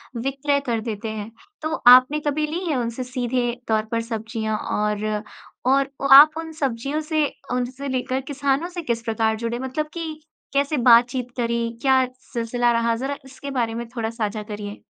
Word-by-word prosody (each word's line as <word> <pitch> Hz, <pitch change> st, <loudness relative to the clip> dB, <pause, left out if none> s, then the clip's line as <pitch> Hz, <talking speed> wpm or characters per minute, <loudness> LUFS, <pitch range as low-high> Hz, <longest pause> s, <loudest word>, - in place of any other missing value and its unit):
विक्रय 275 Hz, +4 st, 0 dB
कर 230 Hz, -2 st, -1 dB
देते 220 Hz, -1 st, -4 dB
हैं। 215 Hz, 0 st, -6 dB, 0.3 s
तो 315 Hz, 0 st, -2 dB
आपने 255 Hz, +4 st, +8 dB
कभी 305 Hz, +1 st, 0 dB
ली 335 Hz, +5 st, -3 dB
है 315 Hz, -4 st, 0 dB
उनसे 235 Hz, +1 st, -2 dB
सीधे 250 Hz, -1 st, -1 dB, 0.2 s
तौर 220 Hz, -1 st, +1 dB
पर 230 Hz, 0 st, 0 dB
सब्ज़ियाँ? 225 Hz, -1 st, -3 dB
और 210 Hz, 0 st, -1 dB, 0.4 s
और 270 Hz, +1 st, +3 dB, 0.2 s
आप 300 Hz, +3 st, +9 dB
उन 325 Hz, 0 st, -5 dB
सब्जियों 275 Hz, -1 st, -2 dB
से 310 Hz, -1 st, +1 dB, 0.3 s
उनसे 250 Hz, +3 st, -3 dB
लेकर 260 Hz, 0 st, -1 dB
किसानों 280 Hz, +2 st, 0 dB
से 355 Hz, -1 st, -5 dB
किस 235 Hz, -7 st, -2 dB
प्रकार 220 Hz, -1 st, 0 dB
जुड़े, 235 Hz, +1 st, -3 dB
मतलब 265 Hz, +4 st, -3 dB
कि 320 Hz, -2 st, -5 dB, 0.3 s
कैसे 280 Hz, +2 st, +1 dB
बातचीत 245 Hz, +1 st, +4 dB
करी? 235 Hz, -1 st, 0 dB
क्या 265 Hz, -1 st, +4 dB, 0.3 s
सिलसिला 240 Hz, 0 st, +1 dB
रहा? 230 Hz, 0 st, +1 dB
ज़रा 270 Hz, +4 st, -3 dB
इसके 270 Hz, +1 st, -8 dB
बारे 235 Hz, -4 st, -1 dB
में 235 Hz, 0 st, -4 dB
थोड़ा 225 Hz, -2 st, -1 dB
साझा 215 Hz, -2 st, -3 dB
करिए। 205 Hz, -1 st, -7 dB
245 Hz, 170 wpm, -23 LUFS, 230-280 Hz, 0.4 s, आप